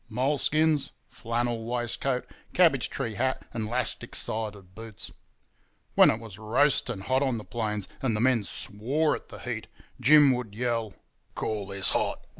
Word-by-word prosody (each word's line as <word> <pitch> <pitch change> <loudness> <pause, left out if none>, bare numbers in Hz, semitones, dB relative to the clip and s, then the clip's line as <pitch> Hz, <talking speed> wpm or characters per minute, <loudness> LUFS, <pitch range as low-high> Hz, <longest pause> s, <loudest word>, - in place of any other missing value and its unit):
Moleskins, 145 +4 +2 0.2
flannel 115 0 -2
waistcoat, 125 +2 -2 0.3
cabbage - - +4
tree 115 - -4
hat 130 +5 -1
and 110 -2 -3
'lastic 125 0 +2
side 105 -4 0
boots. 110 -1 -7 0.8
When - - +7
it 110 - 0
was 110 -3 -11
roasting 120 -1 +1
hot 130 +6 +1
on 130 -4 0
the 110 - -6
plains 105 -4 -3
and 120 -5 0
the - - -1
men 120 -2 +3
swore 130 - -1
at - - -7
the - - -9
heat, - - -5 0.3
Jim 150 -3 +6
would 120 -5 -5
yell, 115 -3 -2 0.4
'Call 105 -3 -3
this 100 -1 +2
hot? - - -1
115 Hz, 150 wpm, -27 LUFS, 110-130 Hz, 0.8 s, When